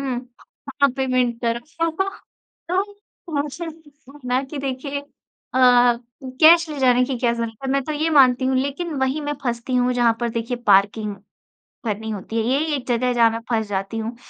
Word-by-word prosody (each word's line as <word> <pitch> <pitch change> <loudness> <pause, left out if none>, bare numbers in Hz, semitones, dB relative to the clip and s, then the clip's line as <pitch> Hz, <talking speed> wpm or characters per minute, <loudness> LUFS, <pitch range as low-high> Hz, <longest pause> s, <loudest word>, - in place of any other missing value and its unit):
हुँ, 255 -2 -4 0.5
हाँ, 280 - +6
पेमेंट 255 -3 0
करो।" 235 0 0 0.3
तो 385 +4 -5 0.9
तो 295 -3 0
मुझे 300 +4 -6 0.6
ना 250 +1 +1
कि 280 +3 -7
देखिए 275 +1 -4 0.5
अ, 260 - +1 0.8
कैश 335 +1 +7
ले 300 - -5
जाने 250 -1 +4
की 260 -1 -3
क्या 235 0 +1
ज़रूरत 230 -1 -4
है, 270 - -2
मैं 275 0 +2
तो 305 - -4
ये 305 +2 0
मानती 260 -4 +5
हूँ। 265 - +1
लेकिन 280 +5 -2
वही 265 +3 0
मैं 295 0 -2
फँसती 240 +1 -2
हूँ, 250 0 +2
जहाँ 240 -2 +3
पर 240 -1 -1
देखिए 230 +2 -3
पार्किंग 205 +1 +3 0.7
भरनी 220 0 -3
होती 210 +2 -6
है। 225 - +1
यही 305 +3 0
एक 270 - -6
जगह 245 0 +1
है, 250 - +1
जहाँ 235 -1 +5
मैं 225 - -3
फँस 220 -3 0
जाती 195 +2 -3
हूँ। 225 +2 -4
250 Hz, 185 wpm, -22 LUFS, 230-280 Hz, 0.9 s, कैश